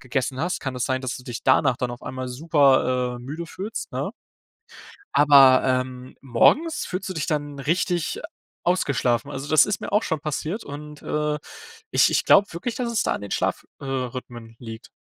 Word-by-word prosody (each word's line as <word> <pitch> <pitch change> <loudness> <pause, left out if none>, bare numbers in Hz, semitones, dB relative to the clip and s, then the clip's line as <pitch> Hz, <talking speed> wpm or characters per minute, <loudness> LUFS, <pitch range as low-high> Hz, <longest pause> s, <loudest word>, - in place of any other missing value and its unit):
gegessen 130 0 -2
hast, 175 +3 -1
kann 135 -2 -4
das 125 - -1
sein, 130 -1 -1
dass 130 -1 -3
du 125 - -11
dich 120 -2 -6
danach 130 -1 +3
dann 125 0 -2
auf 120 0 -9
einmal 130 0 -5
super, 130 -3 +2
äh, - - -9
müde 155 +6 -6
fühlst, 205 +7 -6
ne? - - -2 1.0
Aber, 135 -3 +7
ähm, 130 0 -2
morgens 285 - +2
fühlst 185 +1 -4
du - - -3
dich 155 -4 -2
dann 145 -3 -2
richtig 170 +3 -1 0.4
ausgeschlafen. 140 -9 +1
Also, 135 +2 -6
das 155 - +6
ist 205 0 -2
mir - - -5
auch 210 +2 +3
schon 160 -3 -2
passiert 155 +7 -3
und, 150 +1 -9
äh, 150 0 -1 0.5
ich - - +4
ich - - +1
glaube 200 - +6
wirklich, 190 +8 -4
dass 240 -2 -2
es 225 - +1
da - - 0
an - - -5
den 100 - -7
Schlaf - - -1 0.2
äh, - - -9
rhythmen 125 -3 -5
liegt. 115 -2 -9
140 Hz, 190 wpm, -24 LUFS, 130-165 Hz, 1.0 s, Aber